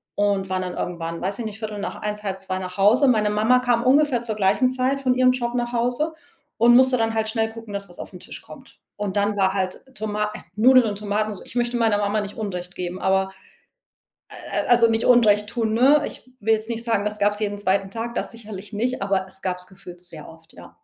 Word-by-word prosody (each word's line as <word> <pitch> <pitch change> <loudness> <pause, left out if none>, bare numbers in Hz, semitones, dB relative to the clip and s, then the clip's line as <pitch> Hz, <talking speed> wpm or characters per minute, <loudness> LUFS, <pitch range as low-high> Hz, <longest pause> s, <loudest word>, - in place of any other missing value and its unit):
und 200 -2 0
waren 185 0 -1
dann 180 -1 -5
irgendwann 170 -1 -4
weiß 195 +2 -2
ich 235 - -3
nicht, 215 -1 -6
13:15, 210 -1 -4
13:30 190 -1 -3
nach 180 0 -7
Hause. 225 +8 +5
Meine 215 -4 +3
Mama 220 +4 +3
kam 245 -2 +1
ungefähr 265 -2 +3
zur 225 -2 -2
gleichen 205 +5 +2
Zeit 260 +2 0
von 260 -2 +2
ihrem 255 0 +4
Job 240 -2 -2
nach 240 0 -2
Hause 245 +7 0 0.4
und 235 +2 +6
musste 260 +1 +6
dann 225 -1 0
halt 220 -1 0
schnell 220 0 0
gucken, 225 -2 -10
dass 200 0 -4
was - - -14
auf - - -8
'n - - -10
Tisch - - -10
kommt. - - -15 0.2
Und 205 -1 -3
dann 205 +1 +1
war 190 -1 +2
halt 185 -2 -2
Toma 210 0 -2
äh, - - -7 0.2
Nudeln 250 +3 +6
und 205 -1 -3
Tomatenso 210 -1 -2
ich - - -10
möchte 240 0 0
meiner 225 -3 +2
Mama 205 +1 0
nicht 205 0 -7
Unrecht 185 -4 -5
geben, 180 +1 -5
aber, 190 0 +1 1.1
äh, - - -2
äh, - - -7
also, 235 -1 +5
nicht 225 0 0
Unrecht 210 -4 +5
tun, 225 -1 -1
ne? 280 +5 +5
Ich 255 - -8
will 220 +2 +2
jetzt 215 +1 -4
nicht 230 0 -3
sagen, 225 -4 0
das 210 0 -3
gab 205 0 +3
es 205 - -5
jeden 205 -1 -1
zweiten 195 -1 0
Tag, 230 +3 -4
das - - -3
sicherlich 215 -3 -9
nicht, 245 +5 -1
aber 195 -1 0
es 190 - -10
gab 185 -1 -1
es 180 - -10
gefühlt 185 -2 -13
sehr 170 -4 -9
oft, 165 0 -16
ja. - - -14
210 Hz, 235 wpm, -23 LUFS, 195-235 Hz, 1.1 s, und